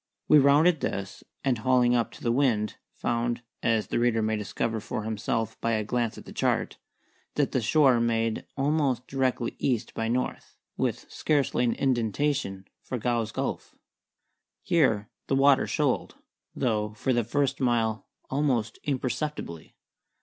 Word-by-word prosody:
We 150 - +7
rounded 150 +4 +5
this, 100 -5 -4 0.2
and, 130 -4 +1
hauling 125 0 +3
up 120 -1 +1
to - - -13
the 115 - +2
wind, 115 -5 +1 0.2
found 120 0 -1 0.2
(as 115 -2 +2
the - - -1
reader 120 -2 +2
may 110 0 +1
discover 110 +2 -2
for 110 - -4
himself 110 +1 -2
by 115 - +1
a 110 -1 +1
glance 120 +1 -1
at - - -10
the - - -10
chart) - - 0 0.6
that - - +1
the 130 - +1
shore 130 +1 +4
made 115 -1 0
almost 140 -3 +1
directly 130 -3 -1
E. 125 -4 +2
by 115 - -2
N., 125 +2 0 0.4
with - - -1
scarcely 140 -5 +1
an 115 - +2
indentation, 120 -4 0
for 130 - -4
Gow's 115 -2 -1
Gulf. - - -4 0.9
Here 110 -11 +2 0.2
the 135 - +1
water 135 0 +5
shoaled, - - 0 0.4
though 105 -3 0
for 130 +4 0
the 120 -1 +2
first 140 +4 0
mile 115 -4 0 0.2
almost 130 -6 0
imperceptibly. 135 - -3
120 Hz, 150 wpm, -27 LUFS, 110-135 Hz, 0.9 s, We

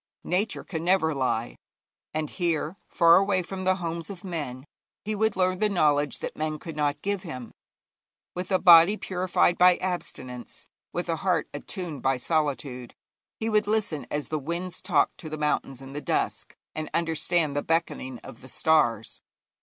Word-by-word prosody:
Nature 195 +4 0
can 165 -3 -5
never 175 -3 +3
lie, 125 -4 -1 0.6
and 155 -1 -3
here, 170 -1 -1
far 170 -1 +6
away 195 -1 +2
from 185 +1 -6
the 185 0 +4
homes 170 -1 -4
of 190 -3 -8
men, 145 -8 -5 0.4
he 215 - -1
would 220 0 +1
learn 185 0 +1
the 215 - +2
knowledge 150 -6 +2
that - - -5
men 155 0 -2
could 160 +1 -8
not 145 -1 -1
give 200 -1 -1
him. 130 - -7 0.8
With 180 +2 -5
a 190 - +5
body 175 +3 +8
purified 180 -2 +1
by 180 0 +7
abstinence, 130 -9 -5 0.3
with 175 - -3
a 165 -1 0
heart 180 -2 +1
attuned 155 -1 -5
by 135 -1 +2
solitude, 135 -4 -2 0.4
he 225 - -2
would 215 -2 +2
listen 210 -9 -1
as 150 0 -3
the 155 - -1
winds 170 +5 -4
talked 175 -6 +1
to 155 - -7
the 155 - -4
mountains 150 -3 -1
in 135 0 -10
the 145 - -4
dusk, - - -1 0.2
and 155 -1 -4
understand 165 -2 +1
the 145 - +1
beckoning 160 -6 -1
of 115 - -11
the 130 - -11
stars. 120 -8 +1
165 Hz, 170 wpm, -27 LUFS, 145-185 Hz, 0.8 s, body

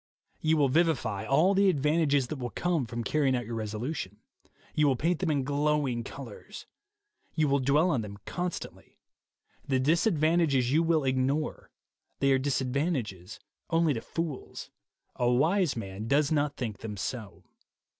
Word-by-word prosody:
You 160 0 +2
will 145 -2 +4
vivify 135 - +1
all 160 +9 +4
the 200 0 +4
advantages 150 -3 +2
that 155 - -4
will 125 -1 -3
come 165 -2 -1
from 115 +1 -4
carrying 140 0 +1
out 120 -1 -2
your 115 - -6
resolution. 110 - -4 0.6
You 150 -1 +3
will 135 - +3
paint 165 +6 0
them 185 - -1
in 145 -3 +1
glowing 145 -3 0
colors. 120 -3 -9 0.7
You 155 -2 +2
will 140 0 +2
dwell 145 +7 +3
on 130 -7 +1
them 100 -1 -8
constantly. 180 0 -5 0.7
The 130 -2 +2
disadvantages 155 - +2
you 155 +3 +4
will 165 -2 +2
ignore. 135 +3 -1 0.5
They 140 0 +2
are 135 - +4
disadvantages 130 - -2 0.3
only 165 -2 +3
to 115 - -4
fools: 165 -2 -5 0.5
a 120 -1 +2
wise 160 +7 +2
man 100 0 -5
does 145 +3 +2
not 145 -2 0
think 110 -6 -4
them 105 -2 -6
so. 100 +2 -5
140 Hz, 155 wpm, -29 LUFS, 120-155 Hz, 0.7 s, will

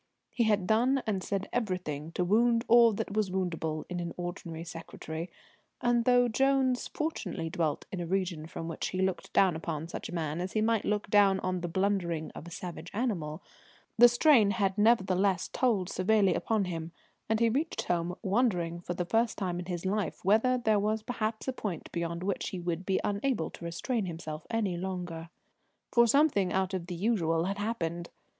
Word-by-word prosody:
He 235 - +1
had 205 -4 +2
done 250 +6 +2
and 200 -3 -1
said 200 0 -2
everything 180 -9 -2
to 180 - 0
wound 230 +4 +3
all 235 -1 +7
that 200 - -3
was 210 -2 +1
woundable 165 -4 -2
in 180 -1 -4
an 170 -1 -4
ordinary 170 -2 -5
secretary, 165 0 -7 0.5
and 240 -4 +2
though 245 -1 +5
Jones 265 +1 +2
fortunately 200 - -3
dwelt 160 -4 -1
in 185 - -3
a 170 - -4
region 180 -4 -1
from 165 0 -6
which 165 - -3
he 185 - -4
looked 190 -2 -1
down 185 -4 +4
upon 160 -1 -4
such - - -6
a - - -7
man 160 -1 -2
as 185 +1 -4
he 215 - +1
might 225 -1 +1
look 210 0 0
down 200 -2 +5
on 185 -1 -1
the 175 - -2
blundering 175 -3 -1
of 170 - -10
a - - -7
savage 175 0 -7
animal, 180 -9 -2 0.5
the 240 +1 +9
strain 240 -3 +5
had 195 -1 +1
nevertheless 195 -4 +3
told 220 -8 +1
severely 195 +1 +2
upon 220 -3 0
him, 165 -2 -5 0.4
and 220 0 +2
he 230 - +4
reached 285 +8 -1
home 175 0 -1
wondering 190 -6 +1
for 175 0 -4
the 180 - -2
first 225 +5 +1
time 180 -3 -2
in 180 - -5
his 175 -1 -4
life 195 -4 -2
whether 225 +6 +4
there 220 -4 +2
was 215 +1 0
perhaps 220 -1 -3
a 265 - 0
point 200 -9 -5
beyond 170 0 -3
which 195 0 -1
he 185 - -5
would 175 +1 -3
be 190 - +2
unable 205 -2 -1
to - - -11
restrain 195 +5 -2
himself 160 -2 -6
any 210 -6 0
longer. 175 -3 -5 0.6
For 235 0 +6
something 250 - +3
out 190 0 0
of 180 -2 -3
the 180 - -4
usual 170 -5 +1
had 195 +3 -2
happened. 175 -6 -3
190 Hz, 190 wpm, -30 LUFS, 170-220 Hz, 0.6 s, the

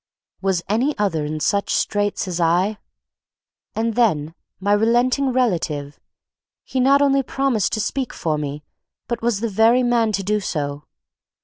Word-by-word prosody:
Was 190 -3 0
any 245 +9 0
other 175 -8 0
in 155 +1 -4
such 200 +6 0
straits 205 -2 -1
as 180 -1 -3
I? 180 +6 +1 1.0
And 225 +1 0
then 165 -10 +1 0.3
my 200 +2 +1
relenting 245 +5 +2
relative; 165 - -1 0.6
he 260 - -3
not 275 +2 +4
only 275 -1 +3
promised 270 -5 0
to 215 - 0
speak 255 +4 -2
for 155 -2 -2
me, 145 0 -5 0.4
but 235 - -3
was 230 -3 0
the 230 - 0
very 225 +4 +3
man 235 -2 +2
to 195 - -1
do 210 +2 0
so. 145 -6 -4
210 Hz, 150 wpm, -21 LUFS, 170-240 Hz, 1.0 s, not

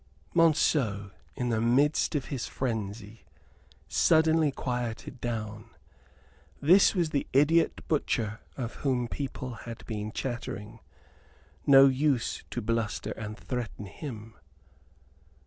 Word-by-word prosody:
Monceux, 140 - +2 0.2
in 125 -2 -2
the 110 -2 +1
midst 140 +7 +2
of 140 - -1
his 130 - -3
frenzy, 110 -3 -4 0.6
suddenly 160 -2 +4
quieted 125 -1 -4
down. 110 -2 -4 0.9
This 180 +9 +5
was 170 -4 +1
the 140 - -1
idiot 155 +5 +3
butcher 115 -8 0 0.2
of 120 -3 -4
whom 125 -4 0
people 130 -1 -5
had 115 0 -9
been 105 -1 -4
chattering. 115 -3 -5 0.9
No 135 -1 +9
use 135 -2 +1
to 120 - -4
bluster 115 -1 -1
and 105 0 -6
threaten 120 -5 -5
him. 115 0 -8
120 Hz, 110 wpm, -29 LUFS, 110-140 Hz, 0.9 s, No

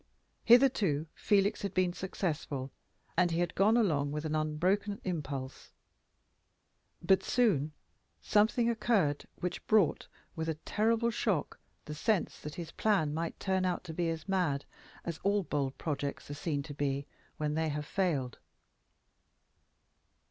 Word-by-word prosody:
Hitherto 230 - +5
Felix 200 -1 +2
had 200 - -4
been 185 -1 +2
successful, 150 -8 -3 0.4
and 180 -1 +4
he 165 - -1
had 175 0 0
gone 215 +4 +4
along 150 -11 +2
with 150 +1 -3
an 155 - -2
unbroken 180 +7 0
impulse. 140 -7 -5 1.3
But 190 +2 +4
soon 190 - +2 0.5
something 220 +3 +3
occurred 215 -11 +1
which 180 - -4
brought 210 -7 +3 0.3
with 160 -1 -2
a 160 - -1
terrible 225 +8 +1
shock 200 -8 -1 0.3
the 150 - -6
sense 185 +5 0
that 150 0 -7
his 170 -2 -6
plan 190 -9 +1
might 165 +1 -3
turn 190 -1 0
out 180 -1 -1
to 165 -3 -7
be 170 +1 0
as 165 0 -4
mad 175 -8 0 0.4
as 170 -2 -4
all 200 0 +1
bold 140 -4 -2
projects 145 -2 -3
are - - -3
seen 145 -1 -2
to 145 0 -8
be 140 -1 -1 0.3
when 150 -1 -1
they 160 0 0
have 150 0 -3
failed. 145 - -1
170 Hz, 140 wpm, -32 LUFS, 150-200 Hz, 1.3 s, Hitherto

